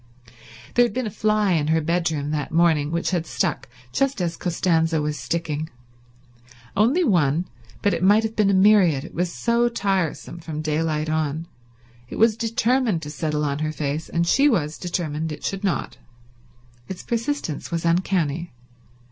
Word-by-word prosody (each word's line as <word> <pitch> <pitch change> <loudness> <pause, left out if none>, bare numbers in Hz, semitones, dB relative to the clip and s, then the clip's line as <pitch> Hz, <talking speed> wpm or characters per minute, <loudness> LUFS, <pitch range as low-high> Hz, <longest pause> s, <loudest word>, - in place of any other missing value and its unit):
There 245 - +5
had 240 - 0
been 255 0 -2
a 215 - -3
fly 215 -1 +1
in 155 -4 +1
her 160 +1 +3
bedroom 160 -3 -1
that 150 -2 -2
morning 160 -3 +3
which 170 +3 -1
had 170 -3 -1
stuck 175 -11 -2 0.2
just 275 -4 +1
as 170 -2 -1
Costanza 165 -2 +1
was 150 0 -1
sticking; 160 -1 -3 1.1
only 245 - +3
one, 170 - +2 0.4
but 205 - +3
it - - -2
might 205 +4 +5
have 220 0 -3
been 210 -2 +3
a - - +3
myriad 190 -8 +5
it 165 - -10
was 175 0 -1
so 235 +3 +1
tiresome 195 -6 -2
from 155 -2 -5
daylight 155 0 -1
on. 155 0 -1 0.6
It - - -7
was 225 -1 +4
determined 230 -4 +1
to 150 - -6
settle 150 -1 -1
on 140 0 -1
her 155 0 -1
face, 150 +1 -3
and 170 0 0
she 275 +12 +4
was 155 - -1
determined 160 -3 -3
it 150 - -8
should 195 +1 -3
not. 195 -3 -2 0.9
Its 190 - -6
persistence 235 - -3
was 170 -1 -2
uncanny. 170 -2 0
170 Hz, 165 wpm, -23 LUFS, 155-205 Hz, 1.1 s, There